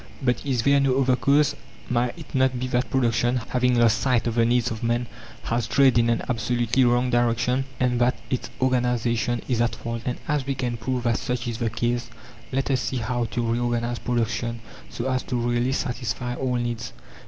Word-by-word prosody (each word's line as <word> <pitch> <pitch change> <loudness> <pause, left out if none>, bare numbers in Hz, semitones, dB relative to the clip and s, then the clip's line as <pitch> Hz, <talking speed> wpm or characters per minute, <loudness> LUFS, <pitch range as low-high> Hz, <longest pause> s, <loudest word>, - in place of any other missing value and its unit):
But 125 -3 0
is 130 -5 0
there 140 +2 +4
no 135 -1 +2
other 130 -1 +3
cause? 145 +2 +3 0.3
Might 120 +2 0
it 165 - -11
not 130 -1 +2
be 125 - -2
that 125 +1 0
production, 120 -1 +1
having 125 0 +2
lost 115 -2 +4
sight 125 -3 +2
of 120 - 0
the 115 0 +3
needs 120 +1 +2
of 110 - -5
man, 120 +1 0 0.4
has 115 0 -1
strayed 130 +2 +4
in 115 0 +3
an 115 - +1
absolutely 120 +1 +1
wrong 125 +1 +2
direction, 120 +2 +1
and 125 -1 +1
that 125 +1 +3 0.2
its 130 - -2
organization 120 -2 +1
is 120 -3 +1
at 120 - +1
fault? 115 0 -5
And 125 +1 -2
as 145 -3 0
we 135 - 0
can 125 -2 -2
prove 125 +2 -2
that 115 -2 +1
such 125 -2 -3
is 115 -2 -3
the 115 -2 0
case, 120 +1 -1 0.4
let 135 +1 0
us 130 - +1
see 130 - -2
how 120 +1 -1
to 120 +1 -2
reorganize 120 0 -1
production 115 -1 -1 0.3
so 120 - -4
as 130 -1 0
to 125 - -4
really 120 +1 +1
satisfy 120 -2 -2
all 125 0 -1
needs. 120 -2 -3
120 Hz, 200 wpm, -24 LUFS, 120-130 Hz, 0.4 s, there